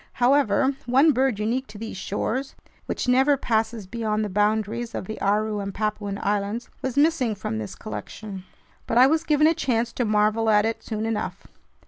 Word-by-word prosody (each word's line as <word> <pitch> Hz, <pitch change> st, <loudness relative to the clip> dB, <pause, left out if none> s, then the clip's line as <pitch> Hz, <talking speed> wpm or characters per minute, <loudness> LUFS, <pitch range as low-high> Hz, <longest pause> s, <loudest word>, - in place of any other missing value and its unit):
However, 265 Hz, 0 st, +3 dB
one 270 Hz, +6 st, +5 dB
bird 260 Hz, -4 st, +1 dB
unique 235 Hz, +5 st, -1 dB
to 210 Hz, -, -11 dB
these 225 Hz, 0 st, -6 dB
shores, 225 Hz, +7 st, -3 dB, 0.3 s
which -, -, -3 dB
never 265 Hz, +3 st, +4 dB
passes 225 Hz, -3 st, -1 dB
beyond 215 Hz, +1 st, -2 dB
the -, -, -4 dB
boundaries 215 Hz, +3 st, 0 dB
of -, -, -4 dB
the 220 Hz, +3 st, -7 dB
Aru 210 Hz, +1 st, +1 dB
and 200 Hz, -1 st, -5 dB
Papuan 210 Hz, -1 st, -2 dB
Islands, 205 Hz, +3 st, -1 dB
was 260 Hz, 0 st, -3 dB
missing 285 Hz, -7 st, +3 dB
from 115 Hz, -, -4 dB
this 105 Hz, -2 st, -6 dB
collection. 185 Hz, -, -7 dB, 0.4 s
But 230 Hz, -, 0 dB
I 250 Hz, -, +8 dB
was 315 Hz, +4 st, +2 dB
given 305 Hz, -2 st, +3 dB
a 320 Hz, -, +5 dB
chance 240 Hz, -7 st, -1 dB
to 245 Hz, -, -1 dB
marvel 215 Hz, +1 st, +2 dB
at 210 Hz, 0 st, +4 dB
it 225 Hz, 0 st, -2 dB
soon 220 Hz, -1 st, -4 dB
enough. 225 Hz, -1 st, -3 dB
225 Hz, 180 wpm, -24 LUFS, 210-255 Hz, 0.4 s, I